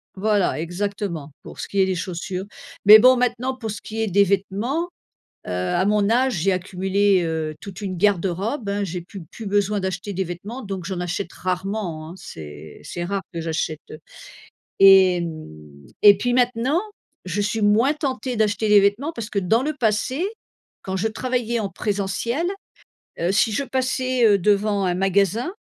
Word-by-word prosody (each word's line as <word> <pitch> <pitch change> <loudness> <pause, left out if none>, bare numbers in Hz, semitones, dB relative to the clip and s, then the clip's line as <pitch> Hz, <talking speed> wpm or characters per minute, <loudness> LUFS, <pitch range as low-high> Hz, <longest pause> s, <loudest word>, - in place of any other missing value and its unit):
Voilà, 205 -3 +1
exactement, 175 -3 -4
pour - - -11
ce - - -4
qui 200 - -2
est 190 - +5
des 190 -1 -1
chaussures. 180 +1 -4 0.4
Mais 210 +2 +11
bon, 255 +3 +7
maintenant, 250 +1 -1
pour 225 -4 -5
ce 205 - -6
qui 225 +1 -5
est 220 - 0
des 200 +1 +4
vêtements, 205 - -1 0.6
heu, - - -5
à 90 - 0
mon 205 0 +2
âge, 255 +2 +2
j'ai 190 +2 +1
accumulé, 190 +1 +1
heu, 160 -2 -2
toute 200 0 -9
une 190 -2 -3
garde-robe, 200 - 0
hein. 200 0 -1
J'ai 180 -1 -5
plus 190 +2 -10
plus 225 - -9
besoin 205 +1 +1
d'acheter 190 +1 -4
des 190 0 -1
vêtements, 195 +9 -7
donc 195 -3 -5
j'en 190 -2 -4
achète 180 +1 -3
rarement, 185 -3 -3
hein. - - -9
C'est 75 - -10
c'est 175 - -5
rare 195 +2 -2
que 170 - -4
j'achète, 160 -1 -2
heu 155 - -8 0.8
et 190 -2 +8
hem, 165 -2 -5 0.6
et 205 -1 +9
puis 245 +3 0
maintenant, 250 +5 +2 0.5
je 185 +3 -2
suis 210 +2 -1
moins 220 +7 +4
tentée 260 -4 -3
d'acheter 215 0 +1
des 210 -1 +7
vêtements, 205 +11 +1
parce 230 -6 -6
que 200 - -1
dans 210 +6 +2
le 305 +3 -1
passé, 255 - 0 0.6
quand 190 0 -3
je 190 - -1
travaillais 240 0 -2
en 205 - -2
présentiel, 205 - -2 0.8
heu, 170 +2 +1
si 215 +3 +2
je 250 - 0
passais, 255 -1 0
heu, 205 -2 +5
devant 205 +1 +1
un 180 - +1
magasin, 200 - +1
200 Hz, 180 wpm, -22 LUFS, 185-225 Hz, 0.8 s, Mais